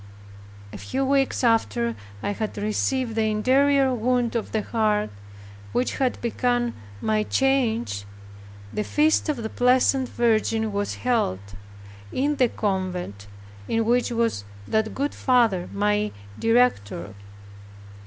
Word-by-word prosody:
A - - -7
few 270 +1 -2
weeks 270 -1 +1
after 120 - +2 0.3
I - - 0
had 215 +1 -4
received 225 +4 -1
that 225 - 0
interior 260 +5 +3
wound 245 0 0
of 230 - -2
the 215 -1 -1
heart, 215 -2 0 0.6
which 250 - 0
had 260 -2 0
begun 240 0 0 0.3
my 215 0 +1
change, 235 - 0 0.7
the 210 - -1
feast 310 +6 +2
of 300 - 0
the 220 -2 -4
Blessed 255 +2 +3
Virgin 220 -2 +1
was 205 0 -2
held, 100 - -1 0.6
in 290 +2 0
the 250 -2 +3
convent 180 - -3 0.4
in 225 0 0
which 245 +2 +2
was 230 - 0 0.2
that 220 0 0
good 285 +2 -1
father 230 -9 +2
my 210 +1 +1 0.3
director. 225 - +1
230 Hz, 125 wpm, -24 LUFS, 210-255 Hz, 0.7 s, interior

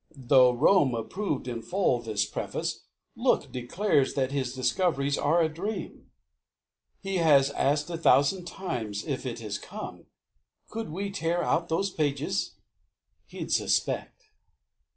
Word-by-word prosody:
Though 130 -1 +5
Rome 140 +1 +4
approved 145 - -3
in 120 -2 -4
full, 175 - +1
this 105 -3 0
preface, - - -4 0.3
look, - - +1
Declares 140 +4 0
that 135 -1 0
his 135 -3 -1
discoveries 140 +2 +1
are 165 +4 +2
a - - +3
dream!" 185 +8 -6 0.9
"He 195 -1 -2
has 140 -5 +5
asked 145 +1 +1
a 165 - -4
thousand 165 +3 +3
times 110 - -4
if 135 -3 -3
it 115 -2 -5
has 105 -1 -4
come; - - -8 0.6
Could 225 -3 -5
we 200 +5 -4
tear 175 -2 -1
out 170 +1 0
those 195 +4 0
pages?" 145 - -1 0.7
"He'd - - -7
suspect." - - 0
145 Hz, 130 wpm, -28 LUFS, 125-175 Hz, 0.9 s, Though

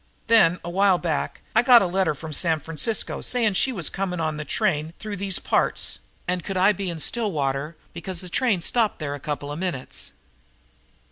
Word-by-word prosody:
Then, 185 -7 +5
a 175 - -5
while 195 0 +4
back, 165 -4 -2
I 225 - +6
got 245 -2 +7
a - - +1
letter 180 -3 +1
from 155 +2 -8
San 160 0 +2
Francisco, 165 +8 -1
saying 240 -3 +2
that 195 - -5
she 260 - +3
was 175 - -2
coming 190 -2 -3
on 155 -2 -2
a - - -3
train 155 +2 -1
through 215 -1 -6
these 195 0 0
parts - - +1 0.3
and 180 -1 -1
could 195 - -3
I 190 +3 +5
be 195 -2 -3
in 170 -2 -5
Stillwater 155 - -1 0.2
because 170 +1 -5
the 180 - -5
train 205 0 +1
stopped 225 +4 +1
there 145 -3 -4
a 145 - -6
couple 145 0 -4
of 150 - -5
minutes. 175 -8 -4
180 Hz, 200 wpm, -24 LUFS, 155-200 Hz, 0.3 s, got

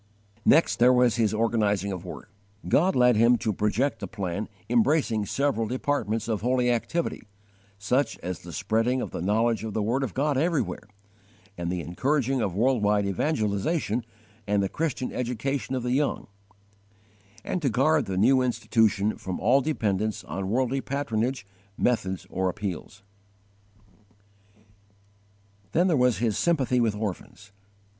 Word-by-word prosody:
22. 125 -5 +5
His 110 -2 +1
organizing 105 -3 +1
of 90 -2 -5
work. 90 - -9 0.4
God 185 +5 +3
led 125 -1 +5
him 115 +3 +5
to 110 -1 -1
project 105 +8 0
a - - -4
plan 100 -1 -4 0.2
embracing 120 -3 +2
several 135 -5 0
departments 115 -3 -1
of 110 -3 -1
holy 125 +1 +2
activity, 160 +8 -2 0.6
such 125 +8 0
as 90 0 -4
the 85 - -10
spreading 115 +8 0
of - - -4
the - - -5
knowledge 110 +5 +1
of 110 -2 -5
the 110 - +1
word 120 +6 0
of 130 -7 -3
God 140 0 +1
everywhere, 140 - -1 0.7
and 85 -1 -3
the 90 -1 -2
encouraging 135 - 0
of 95 -5 -2
world 125 +2 +2
wide 105 0 +2
evangelization 110 - -1 0.4
and 100 -1 +2
the 95 - -1
Christian 150 -5 -2
education 125 +2 -2
of 125 - -2
the 125 - -1
young; 145 +2 0 1.2
and 185 - -2
to 140 - +1
guard 145 +7 +2
the 95 -1 -3
new 130 +6 +4
Institution 110 -4 +1
from 95 -1 -5
all 125 +7 +4
dependence 110 -8 -1
on 95 0 -4
worldly 130 +4 0
patronage, 130 -4 -2 0.3
methods, 95 -7 0
or 95 0 0
appeals. 100 0 -6 2.7
23. 175 0 +3 0.2
His 110 -2 -1
_sympathy 135 -7 +1
with 110 -3 +1
orphans. 105 0 -6
115 Hz, 140 wpm, -26 LUFS, 100-130 Hz, 2.7 s, 22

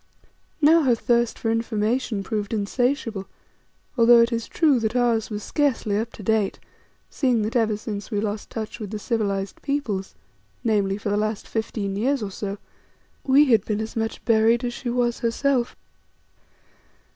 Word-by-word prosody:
Now 325 +3 +7
her 255 -5 +3
thirst 235 0 +1
for 225 - -1
information 225 -1 -1
proved 210 +2 -3
insatiable, 225 -1 -1 0.7
although 235 -1 +7
it 235 +1 +2
is 230 -1 -2
true 300 -7 +3
that 225 +1 -2
ours 235 -3 +2
was 210 -1 -5
scarcely 265 -8 0
up 225 +2 -1
to 210 - -10
date, 215 -1 +1 0.5
seeing 250 -6 +1
that 215 +3 -3
ever 220 -3 +2
since 205 -2 -6
we 205 - -1
lost 210 0 -3
touch 220 +1 -6
with 210 -3 -5
the 215 - -4
civilized 200 -3 -2
peoples, 225 -10 -2 0.5
namely, 200 -4 +1
for 210 - -4
the 205 - +1
last 215 0 -2
fifteen 215 -3 -3
years 255 +4 0
or 200 - -4
so, 200 +1 -5 0.7
we 280 +2 +5
had 220 -3 +5
been 210 -1 -2
as 220 0 -5
much 225 -1 -3
buried 230 +1 +3
as 240 -1 -2
she 245 - -5
was 240 -1 0
herself. 245 +1 0
225 Hz, 165 wpm, -24 LUFS, 210-240 Hz, 0.7 s, Now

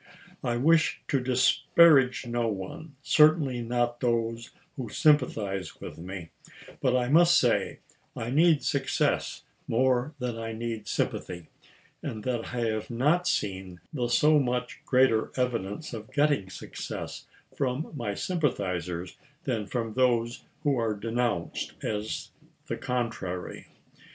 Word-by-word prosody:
I 120 0 0
wish 155 +5 +3
to 135 - +2
disparage 130 +2 +4
no 120 -1 -1
one 110 +9 -6
— - - -38
certainly 150 -5 +4
not 120 0 -1
those 115 -1 -1 0.3
who 130 -6 -5
sympathize 105 - +1
with - - -8
me; 90 -1 -7 0.5
but 130 -2 +2
I 125 -1 0
must 170 +5 +6
say - - +1 0.3
I 115 +1 -4
need 160 +1 +4
success 135 -1 0 0.2
more 130 +4 +1
than 125 -3 -3
I 115 0 -4
need 110 -2 -4
sympathy, 85 -3 -3 0.5
and 110 -2 -5
that 120 -3 -1
I 120 -1 -4
have 110 -2 -1
not 150 +9 +2
seen 95 -2 -2
the 125 -5 -1
so 150 +6 +4
much 125 -2 -2
greater 125 -4 +3
evidence 125 +2 -2
of 110 -1 -7
getting 145 -10 +2
success - - -7 0.3
from 135 +2 -2
my 110 -7 -3
sympathizers 90 - -2 0.3
than 115 - -2
from 115 -2 -3
those 120 -1 +1 0.2
who 140 -4 +2
are 110 -2 0
denounced 115 -3 -2
as 105 0 -3 0.3
the - - -3
contrary. 115 -8 -3
120 Hz, 130 wpm, -28 LUFS, 110-135 Hz, 0.5 s, must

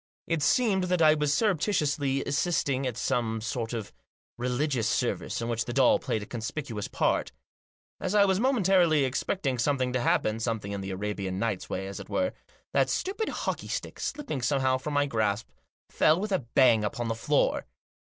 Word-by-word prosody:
It 165 -2 -1
seemed 195 - +3
that 180 -2 +2
I 155 -1 +7
was 150 -2 0
surreptitiously 150 -7 +1
assisting 140 -3 0
at 120 -3 -4
some 120 -3 0
sort 115 +1 -3
of 115 -4 -5 0.4
religious 125 0 0
service - - -1
in - - -2
which 115 -1 -1
the 120 - -4
doll 130 -1 +4
played 110 - -2
a - - -7
conspicuous 115 -1 -5
part - - 0 0.7
As 185 +3 -2
I 205 -1 +6
was 190 -1 +2
momentarily 190 - +3
expecting 135 0 -1
something 130 -1 +1
to 125 - 0
happen, 110 -2 +1
something 110 -3 -2
in 100 -1 -3
the 95 - -5
Arabian 95 -1 -3
Nights 105 -2 -2
way, 95 - -3
as 100 0 -6
it - - -10
were, 275 0 0 0.4
that - - +3
stupid 405 +4 -1
hockey - - -3
stick, - - -4
slipping 285 - -3
somehow 130 0 +1
from 145 +2 -4
my 145 0 +3
grasp, 110 -4 -1 0.4
fell 155 +3 +4
with 210 +1 -3
a 190 - +2
bang 120 -2 +3
upon 115 +3 -2
the 115 - 0
floor. 115 - +1
130 Hz, 180 wpm, -28 LUFS, 115-160 Hz, 0.7 s, I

